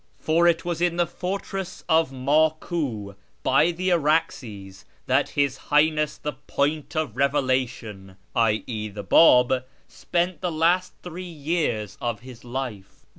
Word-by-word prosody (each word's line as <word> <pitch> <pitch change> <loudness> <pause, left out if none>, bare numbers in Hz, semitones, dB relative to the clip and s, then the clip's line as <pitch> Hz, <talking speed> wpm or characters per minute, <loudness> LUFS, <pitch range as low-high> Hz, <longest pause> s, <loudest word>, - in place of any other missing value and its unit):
For 165 +2 +2
it 170 -1 +2
was 175 -1 -2
in 175 -1 +2
the 175 - +3
fortress 190 +1 -5
of 160 -3 +3
Maku, 140 - 0 0.3
by 150 +5 +4
the 180 +2 -1
Araxes, 130 - -1 0.2
that - - +2
His 140 -2 +2
Highness 150 0 +2
the 150 - -4
Point 145 +3 -2
of 155 -7 -1
Eevelation 130 -7 -1 0.2
(i.e. 110 -1 0
the 100 0 -7
Bab) 125 - +5 0.2
spent 175 0 -2
the 180 -2 -1
last 170 +3 +2
three 180 +1 -7
years 145 - -2
of 120 -2 -2
his 125 -1 -12
life. 120 -6 -6
145 Hz, 130 wpm, -24 LUFS, 120-165 Hz, 0.3 s, Bab